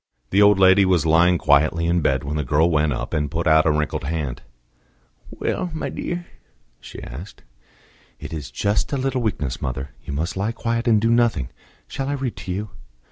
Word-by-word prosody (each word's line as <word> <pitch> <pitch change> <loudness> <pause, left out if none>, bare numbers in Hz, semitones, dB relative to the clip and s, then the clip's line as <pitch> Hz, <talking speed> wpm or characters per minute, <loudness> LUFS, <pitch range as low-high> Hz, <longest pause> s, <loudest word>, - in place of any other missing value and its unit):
The 100 - +4
old 105 -1 +6
lady 95 +1 +6
was 90 -4 +2
lying 85 +3 +4
quietly 80 +3 +3
in 85 +1 +2
bed, 65 -3 +1
when 70 +2 -4
the 75 - -1
girl 75 +6 +2
went 75 -1 +2
up, 65 - -4
and 75 -1 0
put 85 +2 -3
out 80 0 +5
a - - +4
wrinkled 75 0 -1
hand. 75 -5 -3 0.9
"Well, 180 - -3
my - - -3
dear?" 175 0 -4 0.5
she - - -10
asked. 80 +12 -10 0.8
"It - - -8
is 75 -5 -5
just 100 - -1
a 140 - 0
little 130 -1 -1
weakness, 75 - -2
mother. 65 +1 -4
You - - -6
must 80 +5 -2
lie 100 +4 -1
quiet 115 +1 -2
and 110 -2 +5
do 115 +2 +1
nothing. 115 - +2 0.4
Shall 135 0 -4
I - - 0
read 135 -4 -3
to 90 - -6
you?" 105 +3 -4
85 Hz, 195 wpm, -22 LUFS, 75-105 Hz, 0.9 s, old